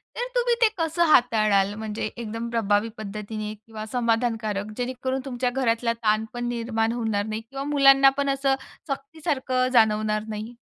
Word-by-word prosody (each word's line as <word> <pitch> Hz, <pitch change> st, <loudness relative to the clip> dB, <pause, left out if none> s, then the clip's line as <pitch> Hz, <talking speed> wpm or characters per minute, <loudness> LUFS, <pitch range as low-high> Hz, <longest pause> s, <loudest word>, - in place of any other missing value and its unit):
तर 485 Hz, -, -2 dB
तुम्ही 485 Hz, -1 st, +2 dB
ते 460 Hz, -, +6 dB
कसं 330 Hz, 0 st, +1 dB
हाताळाल 215 Hz, -8 st, +4 dB
म्हणजे 215 Hz, 0 st, -4 dB
एकदम 230 Hz, 0 st, -5 dB
प्रभावी 215 Hz, -1 st, +1 dB
पद्धतीने 215 Hz, 0 st, -5 dB
किंवा 215 Hz, 0 st, -9 dB
समाधानकारक 225 Hz, -4 st, -1 dB
जेणेकरून 260 Hz, +1 st, -2 dB
तुमच्या 250 Hz, -1 st, -1 dB
घरातला 235 Hz, -2 st, 0 dB
ताण 215 Hz, +1 st, +2 dB
पण 240 Hz, 0 st, -3 dB
निर्माण 230 Hz, -1 st, -1 dB
होणार 220 Hz, -4 st, -1 dB
नाही 220 Hz, 0 st, -4 dB
किंवा 270 Hz, +4 st, -7 dB
मुलांना 275 Hz, -2 st, +6 dB
पण 280 Hz, 0 st, 0 dB
असं 270 Hz, 0 st, +1 dB, 0.3 s
सक्तीसारखं 275 Hz, -3 st, -1 dB
जाणवणार 215 Hz, -2 st, +3 dB
नाही? 220 Hz, +2 st, -6 dB
230 Hz, 145 wpm, -25 LUFS, 215-265 Hz, 0.3 s, ते